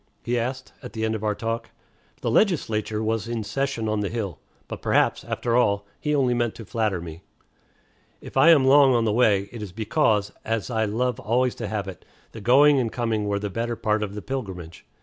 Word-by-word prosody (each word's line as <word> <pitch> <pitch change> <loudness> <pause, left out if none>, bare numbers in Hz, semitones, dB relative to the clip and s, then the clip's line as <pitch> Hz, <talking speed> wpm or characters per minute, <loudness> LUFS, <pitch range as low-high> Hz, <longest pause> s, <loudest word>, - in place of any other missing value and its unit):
he 120 0 0
asked, 130 +2 -4
at 125 - -9
the 110 0 -2
end 110 - 0
of 110 -1 -4
our 105 -1 0
talk. 115 +1 -3 0.5
The 115 - -1
legislature 110 - +1
was 110 0 -1
in 115 -2 -3
session 115 +1 -2
on 110 0 0
the 100 -2 -1
hill. 100 - -4 0.3
But - - -7
perhaps, - - +2
after 120 -1 -2
all, 100 -4 +2
he 150 0 0
only 130 -3 +2
meant 120 -2 -1
to 115 - -9
flatter 105 -3 -1
me. 85 0 -9 1.0
If - - -12
I 135 +5 +6
am 150 -5 +6
long 135 -1 +6
on 115 -1 +2
the 105 - +1
way, 105 -4 +3
it 120 - -8
is 105 -3 -6
because, 105 - +1
as 115 +1 -2
I 110 -1 +1
love 120 +4 -1
always 125 +3 +1
to 115 - -5
have 100 -2 -3
it, 95 -3 -9 0.3
the 110 - -9
going 140 +5 +5
and 115 -3 -1
coming 115 -3 -1
were 100 0 0
the 100 0 -4
better 115 +3 -2
part 105 -1 0
of 105 -1 -4
the 105 - -6
pilgrimage. 95 -11 -6
115 Hz, 215 wpm, -24 LUFS, 105-125 Hz, 1.0 s, I